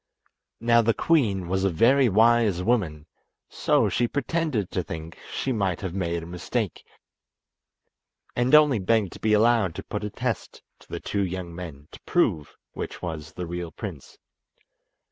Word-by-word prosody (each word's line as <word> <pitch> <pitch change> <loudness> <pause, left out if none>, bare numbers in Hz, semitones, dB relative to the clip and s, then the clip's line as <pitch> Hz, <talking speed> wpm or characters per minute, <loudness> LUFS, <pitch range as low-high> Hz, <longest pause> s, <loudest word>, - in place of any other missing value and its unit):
Now 115 +1 +4
the 115 -1 +2
queen 105 - +2
was 95 +2 0
a 95 - +3
very 120 - +4
wise 110 -3 +4
woman, 90 -10 0 0.4
so - - +2
she 120 - +1
pretended 140 - -1
to 90 - 0
think 80 -1 -8
she 135 - -2
might 100 -7 -1
have 95 -4 -4
made 85 -3 -2
a - - -8
mistake, 90 0 -3 1.5
and 125 +4 +4
only 150 -6 +6
begged 100 -1 +1
to - - -11
be 110 -1 +1
allowed 110 -5 +3
to - - -6
put 105 - -5
a 105 - -2
test 120 +1 -4 0.2
to - - -21
the - - -4
two 100 -1 -1
young 90 -2 -4
men 80 -5 -8
to - - -13
prove 75 -2 0 0.2
which - - -7
was 80 -2 -5
the 90 - -5
real 85 0 -5
prince. 90 -11 -8
100 Hz, 165 wpm, -25 LUFS, 85-115 Hz, 1.5 s, only